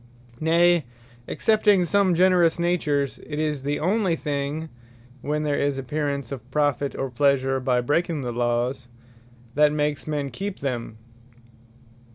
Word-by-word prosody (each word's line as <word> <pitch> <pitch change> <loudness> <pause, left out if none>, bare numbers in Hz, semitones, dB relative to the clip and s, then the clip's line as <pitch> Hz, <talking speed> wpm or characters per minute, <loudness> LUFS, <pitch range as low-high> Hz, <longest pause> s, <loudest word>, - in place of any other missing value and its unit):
Nay, 170 0 +3 0.4
(excepting 210 -4 +3
some 190 0 +2
generous 180 -2 +4
natures,) 150 -5 0
it 150 - -7
is 150 -2 -1
the 145 +2 -2
onely 190 0 +1
thing, 150 +1 -3 0.5
(when 150 +2 -1
there 145 -1 0
is 140 -1 0
apparence 140 -1 -3
of 125 -2 -7
profit, 145 -1 0
or 135 -1 -3
pleasure 135 0 +2
by 125 -1 +1
breaking 155 +4 0
the 125 -2 -3
Lawes,) 120 +2 -1 0.7
that 150 +1 +4
makes 150 0 -1
men 145 -3 -2
keep 195 +8 -5
them. 120 -5 -4
145 Hz, 135 wpm, -24 LUFS, 135-165 Hz, 0.7 s, generous